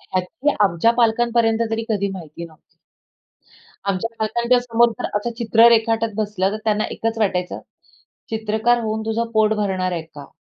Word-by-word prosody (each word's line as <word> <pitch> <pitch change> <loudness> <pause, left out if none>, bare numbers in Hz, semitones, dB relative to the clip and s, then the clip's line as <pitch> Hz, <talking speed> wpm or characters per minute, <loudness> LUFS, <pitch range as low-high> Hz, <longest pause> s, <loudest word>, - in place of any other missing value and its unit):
ह्याची 265 - -2
आमच्या 195 +3 +3
पालकांपर्यंत 230 0 +2
तरी 225 0 -2
कधी 200 -2 0
माहिती 170 -2 -8
नव्हती. 160 -2 -15 1.3
आमच्या 195 +3 -1
पालकांच्या 235 +3 +1
समोर 235 -1 +3
जर - - -3
असं 220 +3 -2
चित्र 230 0 +5
रेखाटत 225 -1 +2
बसलं, 205 -3 -1
तर 215 - -2
त्यांना 215 -1 +1
एकच 225 0 -3
वाटायचं, 180 -4 -1 0.7
"चित्रकार 220 +2 +1
होऊन 220 0 -2
तुझं 230 +1 -1
पोट 220 0 +3
भरणार 190 -3 -1
आहे 170 - -3
का?" 150 -3 -13
220 Hz, 150 wpm, -21 LUFS, 195-230 Hz, 1.3 s, चित्र